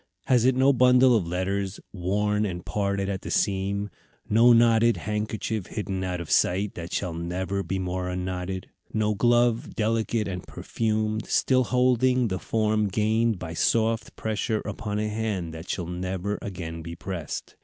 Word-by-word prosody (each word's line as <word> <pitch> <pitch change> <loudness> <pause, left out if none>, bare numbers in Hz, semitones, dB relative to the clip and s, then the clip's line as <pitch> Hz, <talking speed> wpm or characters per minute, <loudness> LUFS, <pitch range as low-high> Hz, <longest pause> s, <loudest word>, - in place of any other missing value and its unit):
Has 125 -3 +3
it 130 0 +4
no 135 +2 +4
bundle 125 0 +5
of 95 -7 +1
letters, 95 +2 -2
worn 105 +3 0
and 90 -4 -4
parted 100 -1 -1
at 95 -1 -3
the - - -7
seam; 100 0 0 0.4
no 115 +3 +6
knotted 115 0 +5
handkerchief 105 -1 -3
hidden 95 -3 -3
out 90 -1 -2
of 85 - -6
sight, 95 +3 +2
that 85 0 -7
shall 90 -4 -2
never 90 +4 -2
be 95 +1 -3
more 90 0 -2
unknotted; 90 0 -4 0.2
no 105 -1 +1
glove, 120 +1 +2
delicate 110 0 0
and 90 -2 -4
perfumed, 110 -1 -2
still 130 -1 +2
holding 125 -1 +2
the 95 -1 -2
form 110 0 +1
gained 110 +2 +1
by 85 -2 -6
soft 115 +6 +1
pressure 110 0 -1
upon 105 -1 -4
a 105 0 0
hand 105 -6 -2
that 80 +2 -9
shall 90 - -2
never 95 +3 -3
again 85 -4 -6
be 85 +1 -7
pressed. 85 -3 -6
105 Hz, 160 wpm, -26 LUFS, 90-110 Hz, 0.4 s, no